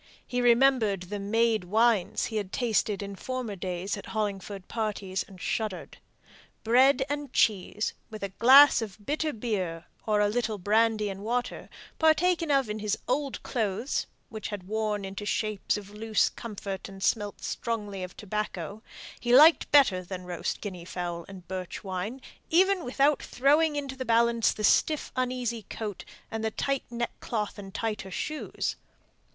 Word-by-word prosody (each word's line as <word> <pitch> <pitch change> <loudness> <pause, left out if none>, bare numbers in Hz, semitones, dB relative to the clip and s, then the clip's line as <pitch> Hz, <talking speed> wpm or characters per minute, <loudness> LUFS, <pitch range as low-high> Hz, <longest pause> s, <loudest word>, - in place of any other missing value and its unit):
He 250 -1 -1
remembered 240 -5 +4
the 205 +3 -5
made 220 0 +1
wines 220 0 +2
he 220 - -3
had 200 -3 -3
tasted 215 -4 0
in 200 0 -6
former 250 -1 -4
days 185 +1 -3
at 200 - -9
Hollingford 200 -2 -3
parties, 205 -4 -2
and 190 -2 -11
shuddered. 215 -2 -3 0.6
Bread 260 +4 +5
and 290 -2 -4
cheese, 210 -1 +1 0.2
with 215 -2 -8
a 200 - -2
glass 260 +8 +7
of 215 -4 -6
bitter 305 +3 0
beer, 195 - -3 0.2
or 210 -1 +3
a 205 - +4
little 220 0 -1
brandy 215 +2 +2
and 195 -1 -5
water, 245 +3 -2 0.3
partaken 330 +1 +3
of 275 -4 +3
in 210 +1 -4
his 210 0 -1
old 275 +2 -1
clothes 225 +2 -1 0.2
(which 220 -1 -5
had 205 -3 -6
worn 210 0 -2
into 195 +2 -6
shapes 210 0 -1
of 205 -1 -9
loose 215 0 +1
comfort, 200 -4 -6
and 195 0 -9
smelt 205 -1 0
strongly 210 -4 -3
of 180 -1 -7
tobacco), 210 -1 -4 0.4
he 240 0 +3
liked 310 +4 +7
better 260 -11 +5
than 185 0 -6
roast 175 -1 -3
guinea 185 -5 -6
fowl 175 -1 -4
and 185 -3 -11
birch 185 -1 -5
wine, 195 +6 -4 0.3
even 375 +2 +4
without 275 +3 +2
throwing 295 +4 +2
into 280 -2 -3
the 260 - -4
balance 235 -1 +3
the 215 - -5
stiff 305 +7 +3
uneasy 250 -2 -1
coat, 210 -4 -5 0.3
and 225 0 -3
the 220 - +1
tight 275 +4 -2
neckcloth 235 -3 -3
and 195 -1 -10
tighter 210 -4 -3
shoes. 305 +10 -3
215 Hz, 155 wpm, -28 LUFS, 195-245 Hz, 0.6 s, glass